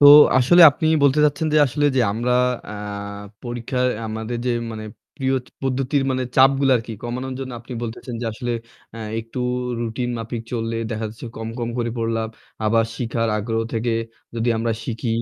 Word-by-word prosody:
তো 145 - +9 0.3
আসলে 175 +8 +7
আপনি 155 +3 -2 0.2
বলতে 140 +1 +4
চাচ্ছেন 150 +2 +1
যে - - +6
আসলে 145 +3 -1
যে - - +5
আমরা 120 +3 0 0.4
আ - - -6 0.7
পরীক্ষায় 120 +1 -1 0.2
আমাদের 110 +2 -4
যে - - +2 0.2
মানে 110 -1 -6 0.3
প্রিয় 135 0 +1 0.3
পদ্ধতির 135 +1 +1
মানে 130 0 0
চাপগুলো 135 +1 +5
আরকি 115 0 -5
কমানোর 125 +2 -4
জন্য 130 -1 -5
আপনি 125 +2 -10
বলতেছেন 120 +1 -5
যে 120 - -2
আসলে 120 +2 -3 0.4
আ - - -7 0.2
একটু 115 +3 -8 0.4
রুটিন 120 +2 -2
মাফিক 115 0 -4
চললে 115 -1 -2
দেখা 110 0 -2
যাচ্ছে 110 +3 -9
কম, 110 0 -4
কম 120 -1 -2
করে 120 -1 0
পড়লাম। 115 -1 -1 0.4
আবার 115 +1 +3
শিখার 115 -1 -1
আগ্রহ 115 +2 -1
থেকে 115 +1 0 0.4
যদি 115 +1 0
আমরা 115 +1 0
শিখি, 115 0 -3
120 Hz, 170 wpm, -22 LUFS, 115-130 Hz, 0.7 s, তো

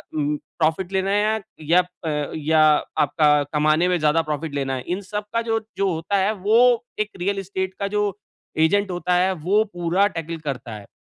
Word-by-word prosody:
अम, 150 -1 0 0.2
profit 165 +4 0
लेना 190 +1 0
है 215 +1 +1 0.2
या 170 +4 +4 0.2
अ, 150 -2 -2
या 155 +1 +2 0.4
आपका 150 +1 +3 0.2
कमाने 155 +3 +3
में 180 - +2
ज़्यादा 155 +2 +3
प्रॉफिट 155 -1 -4
लेना 135 -1 -1
है। 130 - -5
इन 180 +3 -2
सबका 210 +2 -2
जो 225 -1 0 0.2
जो 195 -1 +1
होता 165 +5 -1
है 210 - +1
वो 210 +2 +2 0.4
एक 215 - 0
रियल 195 +2 -1
एस्टेट 190 0 -3
का 200 - -1
जो 205 -1 +1 0.5
एजेंट 200 +3 +1
होता 180 0 0
है 185 +2 +3
वो 205 +4 +4
पूरा 175 +3 +2
टैकल 165 -3 -5
करता 125 -5 -4
है। 105 -1 -11
175 Hz, 185 wpm, -22 LUFS, 155-200 Hz, 0.5 s, या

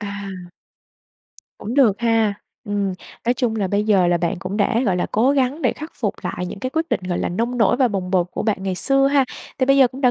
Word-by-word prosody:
À. 200 -3 -7 1.1
Cũng 230 +4 -5
được 235 -8 +4
ha. 225 -3 +2 0.3
Ừm, 200 -2 -1 0.3
nói 245 - +3
chung 240 -3 -1
là 205 -3 0
bây 205 +2 0
giờ 200 -4 +3
là 175 0 +3
bạn 170 -1 -1
cũng 190 +2 -5
đã, 220 +2 +2
gọi 190 -3 +2
là, 180 - 0
cố 235 +5 +3
gắng 280 +2 0
để - - +2
khắc 310 +2 -9
phục - - 0
lại 180 - -3
những 190 - -7
cái 255 - -3
quyết 320 +3 -1
định, 240 - +1
gọi 175 - -1
là, - - -1
nông 235 +7 -2
nổi 220 -4 +3
và 260 -3 +3
bồng 190 -4 -3
bột 180 -2 +2
của - - -4
bạn 205 -3 -1
ngày 190 -1 -2
xưa 275 +8 +3
ha. 275 -1 +3 0.3
Thì 260 - +2
bây 275 +1 +5
giờ 265 -2 +6
cũng 260 +3 -10
đã 255 -3 +4
220 Hz, 255 wpm, -21 LUFS, 195-255 Hz, 1.1 s, giờ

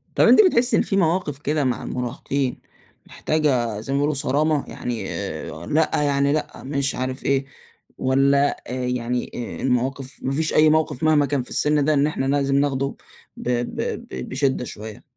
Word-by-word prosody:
طَب - - +5
أنتِ - - +7
بتحسّي 250 -8 +3
إن - - +4
في 195 - -1
مواقف 165 -5 +1
كده 150 +1 0
مع 125 -3 -1
المراهقين، 125 +1 -3 0.5
محتاجة 130 -9 0
زي 125 +6 -4
ما - - +2
بيقولوا 145 +2 +1
صرامة، 145 +2 +1
يعني 120 -2 -4
آآ، 80 +3 -5
لأ 155 +1 +2
يعني 140 -1 +2
لأ، 155 - -3
مش 140 0 -1
عارف 130 +1 -4
إيه 135 0 +1 0.5
والَّا 140 +2 +2
آآ، - - -5
يعني 125 0 -2 0.3
المواقف 130 +1 -1
ما 130 - -1
فيش 155 +3 0
أي 155 0 +6
موقف 155 -3 +1
مهما 155 -2 +4
كان 140 -2 -1
في - - -7
السن 150 -1 +2
ده 155 - +3
إن 145 0 +3
إحنا 150 -3 -2
لازم 140 0 +1
ناخده 140 -1 0 0.4
ب - - -4
ب 120 -1 -1 0.3
ب 65 -1 -6
بشِّدة 130 -1 0
شوية؟ 110 +1 -9
140 Hz, 175 wpm, -22 LUFS, 130-150 Hz, 0.5 s, أنتِ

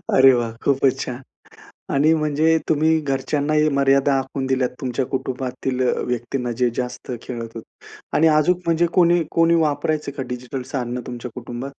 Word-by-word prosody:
अरे 135 0 +8
वाह, 120 -2 0
खूपच 135 -1 +2
छान 125 +1 -5 0.7
आणि 150 +3 +4
म्हणजे 155 +1 +2
तुम्ही 160 +1 +3
घरच्यांनाही 150 +2 0
मर्यादा 140 0 +3
आखून 135 0 -3
दिल्यात 130 -1 +1
तुमच्या 130 0 -1
कुटुंबातील 130 0 -3
अ, - - +2
व्यक्तींना 125 0 -2
जे 125 - +4
जास्त 125 0 -4
खेळत 115 -2 -6
होते 110 - -13 0.3
आणि 160 - +4
अजून 155 +4 +3
म्हणजे 170 +1 +3
कोणी 175 -1 +4
कोणी 165 0 +3
वापरायचं 150 -1 -1
का 135 - -3
डिजिटल 125 +1 -5
साधनं 125 -2 -2
तुमच्या 120 -1 -6
कुटुंबात? 120 +1 -6
135 Hz, 155 wpm, -21 LUFS, 125-155 Hz, 0.7 s, अरे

